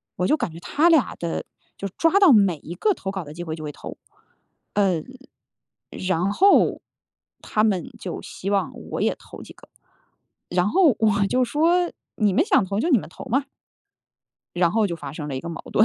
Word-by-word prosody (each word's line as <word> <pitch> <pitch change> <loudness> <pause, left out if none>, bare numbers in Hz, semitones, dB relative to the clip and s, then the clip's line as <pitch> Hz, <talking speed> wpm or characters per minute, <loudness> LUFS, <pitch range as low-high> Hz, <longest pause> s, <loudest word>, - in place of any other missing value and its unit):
我 180 - 0
就 305 - +3
感 165 - -3
觉 165 - -9
他 305 - +2
俩 315 -6 +3
的 170 -1 -3 0.3
就 200 - -4
抓 330 - +2
到 385 -7 +7
每 200 -6 +5
一 165 - -7
个 420 - +2
投 195 - -5
稿 190 -3 -5
的 150 - -10
机 175 +2 -6
会 160 -2 -4
就 155 - -9
会 150 - -4
投， - - -9 1.9
呃， - - -9
然 185 +1 0
后 390 - +4 0.6
他 215 - 0
们 210 +2 0
就 180 - -6
希 195 - -6
望 195 -3 0 0.2
我 - - -2
也 - - +1
投 - - -12
几 - - -13
个， - - -19 0.8
然 180 +2 +1
后 325 - +4
我 205 -2 +2
就 255 +3 +2
说： 335 +7 +2 0.2
“你 210 -3 +2
们 290 - +3
想 210 - +3
投， 200 +3 -2
就 335 - 0
你 265 - +6
们 - - -8
投 - - -11
嘛。” 270 +4 +1 1.1
然 175 -1 +3
后 215 +2 +2
就 170 - -4
发 145 -4 -8
生 150 0 -6
了 135 - -4
一 - - -4
个 170 - -7
矛 165 - -6
盾。 215 - +5
200 Hz, 220 characters per minute, -23 LUFS, 175-270 Hz, 1.9 s, 到